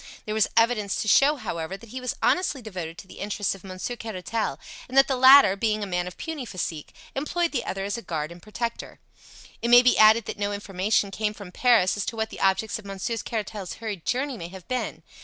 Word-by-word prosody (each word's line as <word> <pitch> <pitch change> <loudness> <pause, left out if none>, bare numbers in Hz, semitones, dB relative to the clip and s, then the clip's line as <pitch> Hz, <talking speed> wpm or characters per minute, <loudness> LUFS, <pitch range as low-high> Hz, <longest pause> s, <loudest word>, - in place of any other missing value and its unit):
There 215 - -3
was 220 -1 +3
evidence 225 -3 +2
to - - -6
show, 280 +8 +5
however, 170 - -5
that 230 +2 -15
he 255 +3 -6
was 250 - -3
honestly 360 -6 +2
devoted 180 -8 -7
to 190 - -11
the - - -13
interests 205 0 -1
of 195 - -13
Monsieur 185 +5 -5
Caratal, 220 -6 -3 0.3
and 260 - -3
that 270 - +7
the 270 - 0
latter, 260 -5 +8
being 215 +1 0
a - - -1
man 180 -2 -2
of 180 - -9
puny 320 -4 -5
physique, 170 -8 -5 0.2
employed 335 +5 -1
the 250 - -1
other 195 0 -3
as 205 +4 -3
a - - -9
guard 155 -4 -4
and 170 0 -12
protector. 230 +3 -5 0.6
It 235 - -1
may 245 +1 +8
be 250 - +4
added 220 0 +7
that - - -6
no 205 0 -1
information 200 0 0
came 210 +1 -2
from 200 -4 -10
Paris 220 -3 +3
as 205 - -2
to - - -3
what 220 0 -2
the - - -9
objects 195 +3 +1
of 215 - -14
Monsieur 200 +4 -3
Caratal's 210 -4 -4
hurried 210 -7 -6
journey 260 +1 -1
may 170 - -6
have 185 0 -12
been. 255 0 -3
215 Hz, 230 wpm, -25 LUFS, 190-240 Hz, 0.6 s, latter